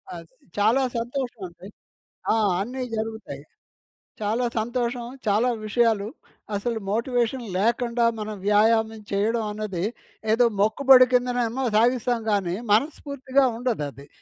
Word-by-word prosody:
అది 165 -1 -12 0.2
చాలా 225 +6 +3 0.2
సంతోషమండి. 230 -7 -5 0.7
ఆ! - - +2 0.2
అన్నీ 255 +5 -4
జరుగుతాయి. 220 -11 -5 0.8
చాలా 220 +4 0
సంతోషం. 240 +1 -2 0.2
చాలా 215 +5 +3 0.2
విషయాలు 215 -2 +2 0.5
అసలు 230 +2 -2
మోటివేషన్ 240 +2 0
లేకండా, 235 +3 +1 0.2
మనం 215 0 -5
వ్యాయామం 220 +1 +3
చెయ్యడం 220 +3 +1
అన్నది 205 -4 -4 0.5
ఏదో 245 +2 +4 0.2
మొక్కుబడి 255 +4 +6
కిందనేమో 245 0 +1
సాగిస్తాం 240 +1 +2
గానీ, 190 -4 0 0.2
మనస్ఫూర్తిగా 275 +2 +1
ఉండదది. 150 - -3
230 Hz, 100 wpm, -24 LUFS, 210-245 Hz, 0.8 s, మొక్కుబడి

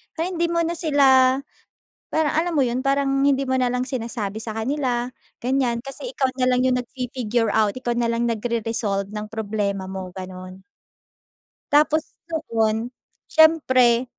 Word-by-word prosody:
Pero 330 +2 -1
hindi 340 -1 0
mo 335 - +1
na 340 +1 -2
sila 270 -5 +4 0.8
parang, 315 -2 +2
alam 335 +2 0
mo 275 - +4
yun? 245 +1 -1
Parang 275 0 +1
hindi 275 -1 +2
mo 260 0 0
nalang 250 0 +1
sinasabi 230 -5 -4
sa 220 -1 -5
kanila, 250 0 -1 0.3
ganyan. 250 -2 0
Kasi 485 - -7
ikaw 265 -1 +1
nalang 255 0 +3
yung 255 -1 +2
nag-fi-figure 245 -3 -2
out, 215 -1 +2
ikaw 255 -2 -3
nalang 235 0 0
nagre-resolve 225 -3 -2
ng 210 0 -5
problema 205 -3 -2
mo, 190 -1 -6
ganon. 185 0 -9 1.1
Tapos 305 +1 +3 0.2
noon, 230 -7 -1 0.4
syempre 260 -7 +4
250 Hz, 140 wpm, -23 LUFS, 220-275 Hz, 1.1 s, sila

